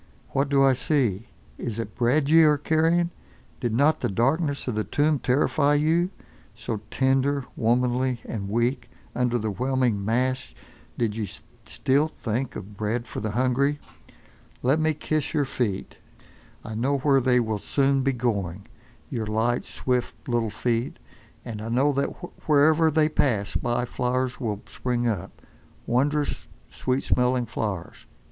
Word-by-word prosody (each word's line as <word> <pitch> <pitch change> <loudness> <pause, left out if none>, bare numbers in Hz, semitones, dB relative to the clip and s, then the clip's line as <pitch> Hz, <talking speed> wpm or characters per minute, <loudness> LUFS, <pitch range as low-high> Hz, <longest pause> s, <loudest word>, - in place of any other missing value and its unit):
What 135 +1 0
do 140 -1 +4
I 135 -1 +5
see? 125 -6 0 0.3
Is 115 -3 -4
it 115 -2 -4
bread 135 +4 +2
ye 165 +2 +7
are 150 -2 +5
carrying? 165 +3 +2 0.5
Did 120 - -1
not 140 +7 +3
the - - -1
darkness 140 - 0
of 125 - 0
the 110 0 0
tomb 150 +3 +1
terrify 145 +3 +2
you—so 150 - -2
tender, 135 +2 +1
womanly 125 +1 +1
and 100 -3 -4
weak; 120 +3 0 0.3
under 125 -1 +1
the 110 -2 -2
whelming 125 -2 0
mass 125 - -1 0.4
did 110 -3 0
ye 110 -4 -3 0.4
still 140 +4 +2
think 125 -3 -3
of 100 +1 -8
bread 110 +4 -2
for - - -5
the 110 - -2
hungry? 130 +5 +1 0.9
Let 135 +5 +3
me 155 -1 +1
kiss 155 0 -2
your 145 -2 +2
feet. 110 -7 -3 0.7
I 110 - -6
know 130 +6 +1
where 135 0 +3
they 125 0 +3
will 110 -3 -1
soon 135 +4 +1
be 135 +1 +2
going, 100 -6 -2 0.5
your 115 -5 -2
light, 115 +3 +1
swift 125 -2 -3
little 120 -3 0
feet. 115 +3 -1 0.5
And 110 -3 -6
I 110 - -5
know 135 +5 +2
that 140 +1 +1 0.4
wherever 155 +2 +5
they 155 0 +3
pass 120 -10 0
by 120 0 0
flowers 125 +1 -1
will 110 -5 -3
spring 120 -1 -2
up—wondrous, 130 - -2 0.2
sweet 130 +1 -1
smelling 125 0 +2
flowers. 100 -7 -5
125 Hz, 145 wpm, -25 LUFS, 115-140 Hz, 0.9 s, ye